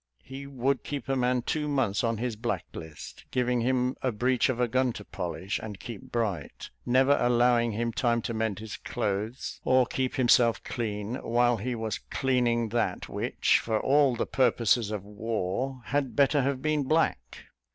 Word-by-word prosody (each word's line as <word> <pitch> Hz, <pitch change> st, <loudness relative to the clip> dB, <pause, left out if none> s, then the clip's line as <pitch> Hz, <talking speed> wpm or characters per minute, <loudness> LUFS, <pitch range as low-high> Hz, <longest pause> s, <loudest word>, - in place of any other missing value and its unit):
He 135 Hz, +1 st, -8 dB
would 135 Hz, 0 st, 0 dB
keep 140 Hz, -3 st, -5 dB
a 135 Hz, -, +1 dB
man 125 Hz, -1 st, +1 dB
two 150 Hz, +3 st, -1 dB
months 125 Hz, -7 st, 0 dB
on 115 Hz, -1 st, 0 dB
his 120 Hz, 0 st, -2 dB
black 105 Hz, -, -2 dB
list, 80 Hz, -2 st, -9 dB
giving 125 Hz, -1 st, +1 dB
him 125 Hz, +1 st, +1 dB
a 130 Hz, -, 0 dB
breech 125 Hz, +4 st, +1 dB
of 125 Hz, -2 st, -1 dB
a 125 Hz, -, +2 dB
gun 130 Hz, +1 st, +1 dB
to 105 Hz, -, -9 dB
polish 90 Hz, +1 st, -4 dB
and 105 Hz, -3 st, -7 dB
keep 115 Hz, +1 st, -9 dB
bright, 100 Hz, -11 st, -3 dB, 0.2 s
never 130 Hz, +3 st, +4 dB
allowing 120 Hz, -1 st, +3 dB
him 115 Hz, +2 st, -2 dB
time 120 Hz, -2 st, +1 dB
to 115 Hz, -, -3 dB
mend 110 Hz, -3 st, -1 dB
his 110 Hz, 0 st, -7 dB
clothes, 110 Hz, +2 st, -3 dB
or 130 Hz, -1 st, +4 dB
keep 130 Hz, +1 st, -2 dB
himself 120 Hz, -2 st, +4 dB
clean, 110 Hz, 0 st, -3 dB
while 120 Hz, 0 st, +2 dB
he 120 Hz, +4 st, -3 dB
was 110 Hz, -1 st, -3 dB
cleaning 120 Hz, -3 st, 0 dB
that 120 Hz, +2 st, -1 dB
which, -, -, +1 dB
for 110 Hz, -1 st, -1 dB
all 140 Hz, -2 st, +3 dB
the 120 Hz, -, -1 dB
purposes 120 Hz, -3 st, +2 dB
of 105 Hz, -3 st, -4 dB
war, 110 Hz, +4 st, -3 dB
had 140 Hz, -1 st, -1 dB
better 140 Hz, +1 st, +4 dB
have 135 Hz, 0 st, -1 dB
been 155 Hz, -1 st, +1 dB
black. 160 Hz, +4 st, 0 dB
120 Hz, 175 wpm, -28 LUFS, 110-130 Hz, 0.2 s, never